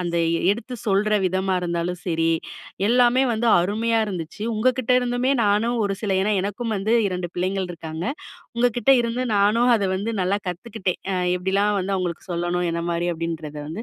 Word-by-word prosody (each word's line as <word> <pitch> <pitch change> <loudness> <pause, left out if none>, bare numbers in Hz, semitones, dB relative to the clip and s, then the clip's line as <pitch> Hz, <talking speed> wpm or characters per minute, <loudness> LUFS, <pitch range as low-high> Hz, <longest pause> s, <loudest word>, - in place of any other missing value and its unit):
அந்த 170 -1 -2 0.3
எடுத்து 240 +4 -3
சொல்ற 205 +2 +2
விதமா 190 +1 0
இருந்தாலும் 175 0 -2
சரி, 165 -1 +1 0.6
எல்லாமே 245 +2 +4
வந்து 230 +1 -1
அருமையா 225 +5 0
இருந்துச்சு. 180 -1 -6
உங்கக்கிட்ட 250 +2 +1
இருந்துமே 245 +1 0
நானும் 210 +4 +2
ஒரு 195 - 0
சில 210 -3 -2
ஏன்னா 215 - +1
எனக்கும் 215 +3 -3
வந்து 210 +4 +1 0.2
2 180 -1 -4
பிள்ளைங்கள் 185 +1 -1
இருக்காங்க. 165 -1 -6 0.5
உங்ககிட்ட 240 0 +2
இருந்து 240 +2 -1
நானும் 220 +5 +3
அத 205 - -1
வந்து 220 +4 -3
நல்லா 190 +2 +1
கத்துக்கிட்டேன். 185 +1 -4
அ - - 0 0.2
எப்படிலாம் 195 +3 +1
வந்து 195 +1 -1
அவங்களுக்கு 175 -3 -3
சொல்லணும் 175 +1 -1
என்ன 170 - -2
மாரி 170 +1 -1
அப்படின்றத 160 -2 -5
வந்து 170 +8 -5
195 Hz, 160 wpm, -23 LUFS, 175-230 Hz, 0.6 s, எல்லாமே